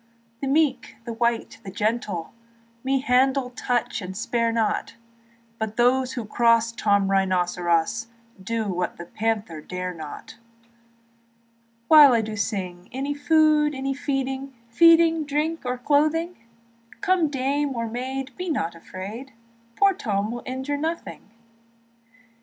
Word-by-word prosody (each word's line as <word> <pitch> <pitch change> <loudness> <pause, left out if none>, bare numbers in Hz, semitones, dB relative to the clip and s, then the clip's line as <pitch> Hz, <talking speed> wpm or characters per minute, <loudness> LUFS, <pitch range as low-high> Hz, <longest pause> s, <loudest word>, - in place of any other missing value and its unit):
The 275 - -2
meek, 275 -2 +1
the 235 - -4
white, 235 0 -1
the 195 - -7
gentle 210 -4 -2 0.5
Me 265 0 +1
handle, 260 0 +2
touch, 245 -2 -1
and 185 0 -7
spare 230 0 0
not; 225 -1 -1 0.6
But 220 -1 -4
those 255 +1 +2
that 235 -4 -4
cross 230 0 +3
Tom 200 -3 +2
Rynosseros 180 +1 +1 0.3
Do 225 +2 -2
what 180 -2 -2
the 170 - -8
panther 210 -5 -2
dare 180 +2 -5
not. 155 -3 -9 1.5
Although 295 -4 +9
I 220 -1 -1
sing, 190 -4 -4
Any 275 +3 -2
food, 300 0 +3
any 270 +1 -2
feeding, 270 -1 -3 0.2
Feeding, 330 +3 +5
drink, 300 +3 -1
or 250 0 -1
clothing; 310 +6 +1 0.7
Come 370 -5 +2
dame 280 +1 -1
or 230 -1 -2
maid, 260 +3 -5
be 365 0 -4
not 170 - -1
afraid, 200 +10 -8 0.4
Poor 395 -1 +4
Tom 210 - -2
will 240 0 -5
injure 265 +3 -3
nothing. 320 -6 -5
245 Hz, 125 wpm, -24 LUFS, 210-285 Hz, 1.5 s, Although